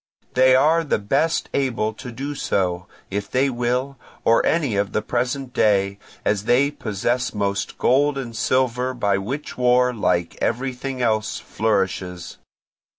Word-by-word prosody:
They 130 0 +5
are 155 +5 +4
the 155 - +1
best 135 +10 0
able 120 -5 0
to 125 +3 -9
do 135 +5 -5
so, 90 -9 -1 0.2
if 100 +1 -3
they 135 +2 +2
will, 125 +3 -1 0.3
of 115 - +5
any 145 -10 +1
of 100 0 -1
the 110 - +1
present 125 +2 -2
day, 100 -1 +2 0.3
as 105 0 0
they 135 +5 +3
possess 120 0 -2
most 100 -1 -2
gold 140 +2 +3
and 120 -4 -5
silver, 130 +1 0
by 100 -4 +1
which 130 +8 -5
war, 125 0 +4
like 85 -6 0
everything 130 +1 -2
else, 110 -2 0
flourishes. 95 -5 -2
125 Hz, 145 wpm, -22 LUFS, 105-130 Hz, 0.3 s, They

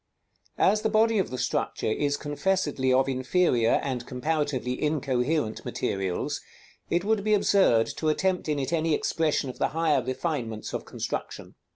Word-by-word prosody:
_ - - -53 0.5
As 210 +2 +3
the 220 - +1
body 220 0 +3
of 190 - 0
the 130 - -5
structure - - -2
is 145 +6 0
confessedly 145 -3 0
of 130 +1 +3
inferior, 130 -2 +2
and 130 -3 -2
comparatively 130 -2 -2
incoherent 140 -3 0
materials, 95 -2 -2 0.5
it 175 +1 +1
would 215 -1 +1
be 215 0 +3
absurd 190 - +4
to 155 - 0
attempt 180 +1 0
in 150 - +1
it 140 +4 -2
any 160 -1 +2
expression 155 -3 0
of 130 - -7
the - - +2
higher 155 -5 +3
refinements 130 -5 -3
of - - -4
construction. - - -5
145 Hz, 160 wpm, -27 LUFS, 130-175 Hz, 0.5 s, absurd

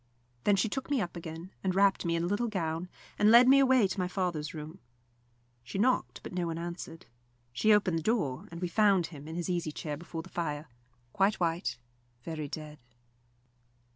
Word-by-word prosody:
Then 205 - +5
she 200 - +2
took 265 +6 -4
me 285 -2 +2
up 180 -5 -3
again, 165 +2 -7
and 185 -1 0
wrapped 195 -2 +3
me 170 0 +1
in 165 - 0
a - - +1
little 205 +6 0
gown, 170 -4 -2 0.3
and 210 - +5
led 240 +2 +8
me 275 +1 +7
away 260 -5 +5
to 190 - -4
my 180 - +1
father's 180 -5 -2
room. 155 +3 -8 0.8
She 130 - -6
knocked, 250 +6 +1
but - - -8
no 180 -1 -1
one 165 -1 -3
answered. 170 -1 -6 0.5
She 215 - +3
opened 195 -5 +3
the - - -5
door, 155 - -1
and 170 +1 -8
we - - +1
found 195 -1 +3
him 150 -3 -10
in 160 - -6
his 175 -1 -3
easy 175 -3 -1
chair 150 -1 -5
before 165 0 -7
the 185 - -13
fire, 150 -4 -3 0.5
very 195 +2 +4
white, 170 +1 -1 0.5
quite 155 -3 -5
dead. 150 -1 -7
175 Hz, 200 wpm, -30 LUFS, 160-200 Hz, 0.8 s, led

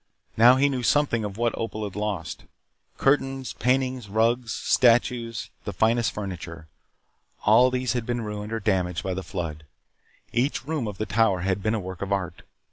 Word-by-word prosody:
Now 120 +3 +7
he 135 +2 +3
knew 135 -3 -1
something 130 -3 +2
of 100 -1 -5
what 120 0 0
Opal 110 -1 -4
had 100 -3 -5
lost. 105 -5 -4 0.5
Curtains, 135 -1 +1
paintings, 130 -2 0
rugs, 115 +2 +1
statues, 115 -3 +2
the - - -4
finest 115 +1 +2
furniture. 85 -5 -7 0.8
All 115 +4 +6
these 125 -1 -1
had 120 -2 -3
been 120 -1 -1
ruined 105 -1 -5
or 115 - -1
damaged 90 -5 0
by 95 - -2
the 95 - -3
flood. 85 -6 -5 0.7
Each 130 +3 0
room 150 -6 -2
of 105 -2 -6
the 110 - -2
Tower 100 -2 +2
had 95 +1 -1
been 110 +2 0
a - - -1
work 95 -2 -7
of 100 0 -4
art. 95 -3 -2
110 Hz, 175 wpm, -25 LUFS, 95-125 Hz, 0.8 s, Now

